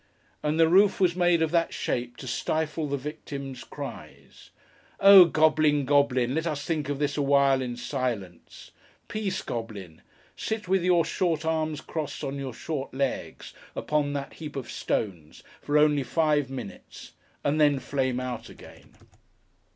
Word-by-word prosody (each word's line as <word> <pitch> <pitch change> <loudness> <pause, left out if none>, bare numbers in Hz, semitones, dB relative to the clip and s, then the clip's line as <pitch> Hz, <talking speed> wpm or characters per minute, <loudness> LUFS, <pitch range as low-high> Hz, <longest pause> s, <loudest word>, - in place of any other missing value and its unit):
And 150 +2 -1
the 165 - +6
roof 190 +4 +4
was 180 -3 +3
made 175 -2 +3
of 160 - -1
that 170 -1 +1
shape 120 0 -3
to - - -9
stifle 155 +4 -2
the 140 0 -1
victim's 140 -2 -7
cries! - - -10 0.5
Oh 195 -2 +10
Goblin, 155 -3 +3
Goblin, 130 -3 +2
let 160 +3 -1
us 150 -3 -3
think 155 -4 -2
of 145 - -1
this 145 0 -1
awhile, 140 -1 +3
in 125 -2 -4
silence. 120 - -5 0.4
Peace, 210 -3 -3
Goblin! 100 -8 -6 0.3
Sit 220 -3 -4
with 190 -1 +2
your 175 -2 +3
short 165 -2 -1
arms 155 -2 -1
crossed 155 -3 -5
on 140 +1 -3
your 130 -4 -5
short 135 -1 -5
legs, 135 -1 -3 0.2
upon 150 -1 0
that 140 -1 -5
heap 155 -3 -8
of 135 -3 -5
stones, 85 -8 -3 0.2
for 145 +1 +1
only 150 -1 +4
five 150 0 +1
minutes, 125 -7 -9 0.3
and 150 +2 +1
then 145 -2 +4
flame 130 -1 -1
out 125 -1 -5
again. - - -15
145 Hz, 150 wpm, -27 LUFS, 130-160 Hz, 0.5 s, Oh